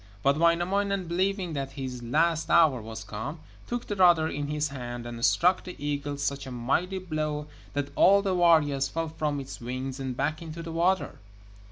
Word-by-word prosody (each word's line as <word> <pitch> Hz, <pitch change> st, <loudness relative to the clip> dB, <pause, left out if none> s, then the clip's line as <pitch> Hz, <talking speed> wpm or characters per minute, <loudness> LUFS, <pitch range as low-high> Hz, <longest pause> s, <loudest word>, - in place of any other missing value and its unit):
But 140 Hz, 0 st, +4 dB
Wainamoinen, 185 Hz, +3 st, +2 dB
believing 185 Hz, +1 st, -1 dB
that 135 Hz, -2 st, -4 dB
his 130 Hz, -3 st, -5 dB
last 160 Hz, +7 st, +1 dB
hour 155 Hz, -8 st, +5 dB
was 110 Hz, 0 st, -7 dB
come, 110 Hz, +9 st, -5 dB, 0.3 s
took 240 Hz, 0 st, -3 dB
the 205 Hz, -, -3 dB
rudder 175 Hz, -4 st, +5 dB
in 145 Hz, -1 st, -3 dB
his 150 Hz, 0 st, -1 dB
hand 120 Hz, -3 st, -6 dB
and 120 Hz, -1 st, -6 dB
struck 180 Hz, +6 st, +3 dB
the 180 Hz, -, -8 dB
eagle 145 Hz, 0 st, -3 dB
such 140 Hz, -1 st, -2 dB
a -, -, -6 dB
mighty 140 Hz, +11 st, 0 dB
blow 155 Hz, -4 st, -3 dB, 0.3 s
that 145 Hz, 0 st, -2 dB
all 200 Hz, +1 st, +6 dB
the 195 Hz, -2 st, 0 dB
warriors 155 Hz, -6 st, +4 dB
fell 165 Hz, 0 st, -3 dB
from 150 Hz, -2 st, -2 dB
its 135 Hz, -2 st, -8 dB
wings 130 Hz, +2 st, -4 dB
and 130 Hz, -2 st, -4 dB
back 155 Hz, +3 st, -1 dB
into 165 Hz, 0 st, -7 dB
the 165 Hz, -, -6 dB
water. 175 Hz, +3 st, 0 dB
150 Hz, 185 wpm, -27 LUFS, 135-170 Hz, 0.3 s, all